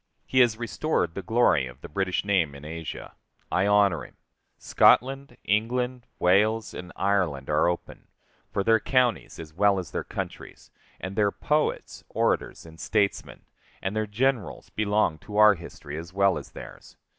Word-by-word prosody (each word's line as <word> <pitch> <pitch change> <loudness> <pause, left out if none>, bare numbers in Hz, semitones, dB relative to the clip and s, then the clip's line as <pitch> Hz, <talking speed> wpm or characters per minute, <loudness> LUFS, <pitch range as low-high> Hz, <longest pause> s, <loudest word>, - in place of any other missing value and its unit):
He 130 - +1
has 120 -4 +4
restored 110 -6 -1
the 100 - -5
glory 105 - +2
of 65 +2 -13
the - - -8
British 95 +4 -1
name 90 -8 +1
in 70 +1 -11
Asia. 80 +1 -7 0.4
I 95 +2 +2
honor 100 -6 +3
him. - - -14 0.4
Scotland, 135 0 +3
England, 125 +4 -1
Wales, 105 +5 +2
and 90 -1 -8
Ireland 90 -9 0
are 75 +2 +3
open, 85 0 -4 0.4
for 100 - -1
their 115 +2 +4
counties, 125 -2 0
as 80 -2 -10
well 100 +3 +3
as 90 -4 -5
their - - -3
countries, - - -7 0.3
and 95 +1 -6
their 105 -1 +3
poets, 150 +7 -1
orators, - - -1
and 80 0 -14
statesmen, 100 0 -1 0.3
and 95 +2 -3
their 110 0 -1
generals, 120 +2 -1
belong 105 -6 +1
to 105 +5 -7
our 105 0 +8
history 80 -4 -8
as 85 +1 -9
well 95 -3 +2
as 70 - -12
theirs. - - -12
100 Hz, 160 wpm, -26 LUFS, 85-110 Hz, 0.4 s, our